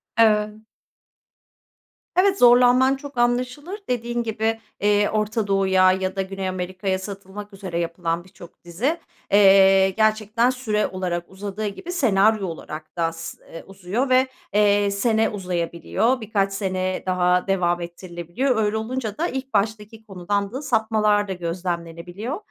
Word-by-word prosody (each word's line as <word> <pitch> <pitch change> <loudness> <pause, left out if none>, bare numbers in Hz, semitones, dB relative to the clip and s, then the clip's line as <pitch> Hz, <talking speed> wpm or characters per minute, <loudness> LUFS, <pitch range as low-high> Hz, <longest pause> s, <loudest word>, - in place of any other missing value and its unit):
E 215 -1 +3 1.6
Evet, 385 +2 +3
zorlanman 250 +2 +6
çok 280 -1 -10
anlaşılır. 250 - -1
Dediğin 240 -1 -1
gibi, 225 0 -1 0.2
eee, 205 0 +3
Orta 215 0 -1
Doğu'ya 190 -1 +4
ya 190 0 -2
da 195 - 0
Güney 190 0 -4
Amerika'ya 185 +1 -3
satılmak 200 +1 -8
üzere 190 -3 -5
yapılan 170 0 -2
birçok 180 -2 -16
dizi, 225 - -2 0.3
eee, 195 -1 +6
gerçekten 215 +3 +1
süre 225 -5 -1
olarak 180 -2 -3
uzadığı 200 +2 -5
gibi 205 - -6
senaryo 215 - +2
olarak 155 0 -8
da 170 - +1
as 165 0 -4 0.2
eee, 165 - -8
uzuyor 195 +7 -3
ve, 255 +1 +4 0.3
eee, 205 -1 +3
sene 220 +2 +1
uzayabiliyor. 185 +5 -1
Birkaç 200 -2 0
sene 185 -2 -2
daha 180 0 +1
devam 175 -2 +1
ettirilebiliyor. 175 - -3
Öyle 210 +1 0
olunca 220 -1 -4
da 335 - 0
ilk 265 -2 -5
baştaki 215 +1 -2
konudan 200 +1 -2
da 265 +3 -5
sapmalar 215 -6 +1
da 190 - -3
gözlemlenebiliyor. 175 - -5
205 Hz, 135 wpm, -23 LUFS, 185-225 Hz, 1.6 s, zorlanman